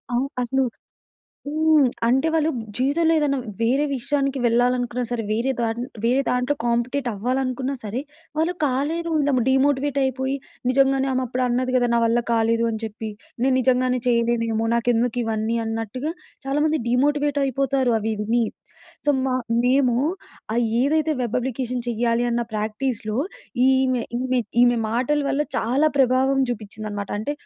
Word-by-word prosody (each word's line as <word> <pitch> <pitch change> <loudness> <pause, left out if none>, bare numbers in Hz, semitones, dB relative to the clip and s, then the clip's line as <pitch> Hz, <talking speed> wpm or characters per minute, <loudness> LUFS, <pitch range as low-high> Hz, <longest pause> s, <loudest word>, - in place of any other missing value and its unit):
ఆవ్ 250 +3 +1 0.2
అసలు 265 +2 +1 0.8
హ్మ్. 310 -2 +4 0.2
అంటే, 265 +6 +3
వాళ్ళు 320 -1 +2 0.3
జీవితంలో 310 +6 +2
ఏదైనా 280 -2 +1 0.3
వేరే 260 +5 +2
విషయానికి 275 +1 -1
వెళ్ళాలనుకున్నా 245 +1 +1
సరే, 240 -2 -2
వేరే 235 +5 +1
ద - - +1 0.4
వేరే 255 +3 +3
దాంట్లో 250 +3 +1
కాంపెటేట్ 240 +3 0
అవ్వాలనుకున్నా 255 +4 -1
సరే, 220 +5 -3 0.4
వాళ్ళు 330 +3 +1
కాలేరు. 305 +6 -1 0.4
డీమోటివేట్ 275 +1 +2
అయిపోయి, 265 +1 -1 0.3
నిజంగానే 270 +1 +3
ఆమె 260 - 0
అప్పుడు 255 +1 -2
అన్నది 250 +1 0
కదా! 245 -1 +3
నా 235 - +4
వల్ల 230 +1 +2
కాలేదు 230 0 +2
అని 220 - -4
చెప్పి. 220 0 -6 0.3
నేను 265 +1 +3
నిజంగానే 255 0 +2
చేయలేనేమో! 230 -2 +1
నాకెందుకు 240 0 +1
ఇవన్నీ, 225 +1 -1
అన్నట్టుగా 225 +7 -3 0.3
చాలామంది 300 +3 +1
డీమోటివేట్ 290 +3 +1
అయిపోతారు 265 -2 +1
అవి 220 +1 -1
విని. 230 +3 +1 0.6
సో, - - +5
మ - - 0 0.4
మేము 255 -1 +3 0.6
అయి 240 -1 +2 0.2
ఏదైతే 310 +2 +2
వెబ్ 240 -1 -1
అప్లికేషన్ 250 0 -3
చెయ్యాలి 235 +1 +1
అన్న 235 0 +1
ప్రాక్టీస్‌లో 215 +1 -2 0.5
ఈమె 260 -2 +2 0.2
ఈమె 255 -1 +1 0.2
ఈమె 245 0 +4
మాటల 255 +6 +1
వల్ల 285 +2 +1
చాలా 265 +7 +2
ప్రభావం 265 +1 +3
చూపించింది 215 -1 -6
అన్నమాట. 205 -1 -5
అంటే, 255 +7 -2
255 Hz, 140 wpm, -23 LUFS, 235-275 Hz, 0.8 s, సో